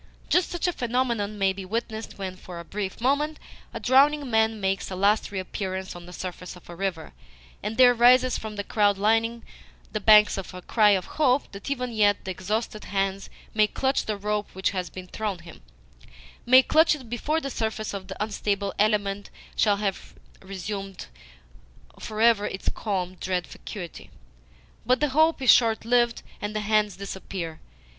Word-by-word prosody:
Just 360 -1 +3
such 350 0 -3
a 355 - 0
phenomenon 235 -5 -1
may 195 -1 +2
be 195 0 -7
witnessed 220 +2 -4
when, 190 -2 -5
for 180 -1 -10
a 170 - -9
brief 195 0 -5
moment, 290 +5 +1 0.3
a - - -6
drowning 280 +1 +3
man 220 0 +2
makes 195 -1 -1
a 190 - -5
last 200 +3 +2
re 200 - -5
appearance 190 0 -4
on 175 0 -10
the - - -10
surface 180 0 -7
of 180 - -16
a - - -9
river, 180 -3 -4 0.5
and 220 +2 -4
there 250 -1 +7
rises 250 +1 +5
from 220 -1 -5
the 205 - -3
crowd 205 -1 +2
lining 225 +3 +1 0.5
the 215 - -2
banks 210 -1 +6
a 185 -1 -8
cry 215 -3 +4
of 190 -3 +2 0.2
hope 270 -1 +3
that 200 +6 -8
even 250 -3 -2
yet 205 -2 +2
the 190 - -3
exhausted 210 +4 -3
hands 195 0 -2 0.2
may 215 -1 +4
clutch 265 +4 0
the 215 -1 -1
rope 210 +1 -2
which 190 +1 0
has 185 -3 -3
been 185 +1 -9
thrown 205 +1 -4
him 170 - -13 0.9
may 255 +2 +8
clutch 320 +2 +4
it 260 -5 -11
before 285 +7 -1
the 275 -3 -5
surface 220 -2 -3
of 195 -1 -6
the 190 - -7
unstable 200 -2 -2
element 205 -1 +1 0.3
shall 205 -2 +3
have 200 -2 -4 0.3
resumed 195 0 -6 0.9
for 215 0 -6
ever 225 -3 +4
its 190 - -3
calm, 185 -4 -3
dread 180 -1 -1
vacuity. 180 -6 -9 0.7
But 250 +2 +2
the 295 - +1
hope 315 +1 +3
is 255 - +8
short 225 -2 +3
lived, 240 0 +2 0.2
and 210 +1 -4
the 215 - 0
hands 210 -2 +1
disappear. 190 -4 -6
210 Hz, 180 wpm, -26 LUFS, 195-235 Hz, 0.9 s, may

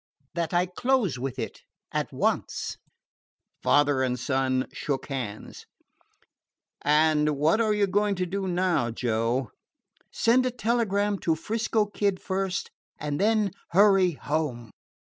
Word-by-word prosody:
"That 170 -2 -2
I 175 +1 +2
close 200 - 0
with 130 0 -4
it - - -5 0.3
at - - -2
once." - - -1 0.9
Father 145 -2 +3
and 125 -1 0
son 130 0 0
shook 140 -1 -3
hands. 120 -7 -6 1.1
"And 150 0 +3
what 160 +10 +3
are 215 -2 +2
you 205 -1 +3
going 205 +1 +1
to 180 0 -1
do 190 +2 -3
now, 175 -9 +1
Joe?" 115 +1 -1 0.6
"Send 255 +3 +3
a - - +1
telegram 210 -4 0
to 165 - +1
'Frisco 220 +5 0
Kid 200 -2 -1
first, 190 0 -2 0.3
and 145 -1 -3
then 215 -1 +2 0.2
hurry 195 -2 +5
home." 140 -7 -3
175 Hz, 130 wpm, -26 LUFS, 135-205 Hz, 1.1 s, hurry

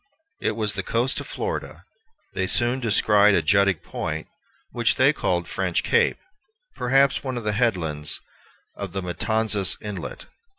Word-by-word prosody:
It - - 0
was 105 -2 0
the 100 - -2
coast 115 +7 0
of - - -8
Florida. - - -5 0.5
They 95 - -1
soon 120 +6 +1
descried 105 -3 +4
a 85 - +2
jutting 100 +3 +4
point, - - -5 0.5
which - - +2
they - - +4
called 85 -1 -1
French 95 -3 -1
Cape, 470 +1 +2 0.6
perhaps 135 +2 +2
one 130 -2 -3
of 120 - -4
the 105 - 0
headlands 85 -10 0 0.6
of 100 -2 -7
Matanzas 100 +2 +1
Inlet. 105 -2 -7
105 Hz, 140 wpm, -24 LUFS, 95-120 Hz, 0.6 s, descried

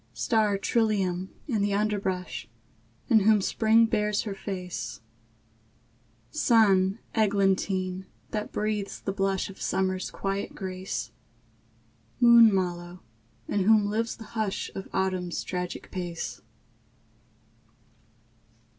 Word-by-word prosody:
Star 215 -3 +2
trillium, 195 -4 0 0.2
in 225 -7 0
the 200 0 +1
underbrush, 190 - -2 0.6
In 225 - +6
whom 215 +1 +4
Spring 220 +3 +3
bares 210 -2 0
her 210 - -4
face; 180 - -5 1.3
Sun 200 -4 +4 0.2
eglantine, 195 -3 +1 0.2
that 210 -1 -3
breathes 210 -1 -2
the 195 - -3
blush 195 -1 0
Of 195 - -12
Summer's 185 -1 -1
quiet 195 0 -3
grace; 185 - -4 1.1
Moon 235 -2 +8
mallow, 175 -2 -2 0.4
in 200 -2 0
whom 215 -1 +5
lives 225 +3 -1
the 225 - -10
hush 215 -4 -2
Of 195 - -7
Autumn's 185 -2 -1
tragic 180 -1 -5
pace. 175 -3 -5
195 Hz, 100 wpm, -27 LUFS, 185-215 Hz, 1.3 s, Moon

